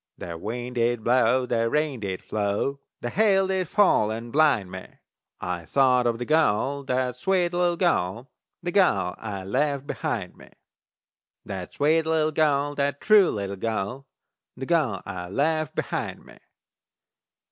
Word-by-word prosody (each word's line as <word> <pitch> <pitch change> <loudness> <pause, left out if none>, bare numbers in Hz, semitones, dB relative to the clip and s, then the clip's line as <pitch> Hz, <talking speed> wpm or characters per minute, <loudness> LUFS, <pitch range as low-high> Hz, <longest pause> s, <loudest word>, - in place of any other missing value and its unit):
The 85 -1 -7
wind 120 +7 -5
did 120 -1 +1
blow, 125 +1 +3
the 115 -2 0
rain 150 -2 0
did 95 -3 -4
flow, 105 +6 -1 0.2
The 120 - -3
hail 195 -3 +3
did 190 -2 -1
fall 195 - +3
and 115 +2 -6
blind 140 -11 +3
me; 95 0 -8 0.5
I 90 -1 -4
thought 125 - +3
of 115 -1 0
that 120 - -4
gal, 140 -2 +1
that 125 -1 -1
sweet 180 +4 0
little 175 -1 +1
gal, 125 - 0 0.3
That 175 - -2
gal 100 - +2
I'd 100 -4 -5
left 140 +7 -1
behind - - -4
me! - - -16 1.0
That 95 -3 -6
sweet 160 +2 +2
little 155 -1 +2
gal, 145 -2 +1
that 140 0 -1
true 210 -4 +5
little 100 -1 -4
gal, 115 +6 -3 0.5
The 130 - -5
gal 130 - 0
I 90 -2 -6
left 155 - 0
behind - - -4
me! - - -16
130 Hz, 150 wpm, -25 LUFS, 110-155 Hz, 1.0 s, true